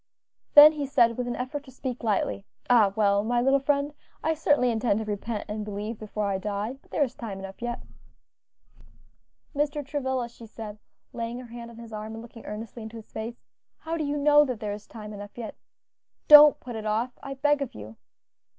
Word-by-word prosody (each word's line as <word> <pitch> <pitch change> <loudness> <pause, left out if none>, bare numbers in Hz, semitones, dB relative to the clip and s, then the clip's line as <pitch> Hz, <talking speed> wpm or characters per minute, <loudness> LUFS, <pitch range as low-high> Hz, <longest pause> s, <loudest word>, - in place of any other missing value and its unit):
Then 295 +1 +12
he 295 -3 -4
said, 235 -4 +4
with 250 +1 -3
an 240 - -2
effort 275 +3 -4
to - - -13
speak 255 -1 -5
lightly. 190 - 0 0.3
"Ah, 220 -5 +6
well, 200 -2 +3
my 240 +2 +1
little 270 +3 +4
friend, 280 +1 0 0.3
I 320 - +2
certainly 290 -5 +2
intend 220 -2 +1
to 220 - -3
repent 210 +1 -3
and 210 0 -4
believe 210 +2 -5
before 215 -1 -3
I 195 -1 -1
die, 210 +6 -3
but - - -27
there 295 - +1
is 255 -3 -3
time 220 -7 -6
enough 195 +2 -9
yet." 240 0 -4 1.7
"Mr. 295 0 -1
Travilla," 265 -4 -2
she 235 -1 -13
said, 215 -1 -8 0.3
laying 235 0 -4
her 245 -2 -10
hand 235 -1 -8
on 235 - -13
his 230 -1 -10
arm 215 +1 -6
and 225 - -7
looking 230 -1 -12
earnestly 220 +2 -7
into 220 +1 -8
his 220 - -13
face, 230 +2 -6 0.3
"how 325 +1 -4
do 320 - -2
you 290 0 -1
know 295 +1 +6
that 255 -6 -3
there 210 -2 -3
is 210 0 -9
time 215 -2 -9
enough 205 +1 -9
yet? 230 -3 -5 0.7
don't 300 0 +10
put 245 -2 -8
it 215 -1 -4
off, 230 +4 -1
I 275 0 -6
beg 290 +1 +2
of 275 - -4
you." 105 +1 -9
235 Hz, 205 wpm, -27 LUFS, 215-275 Hz, 1.7 s, Then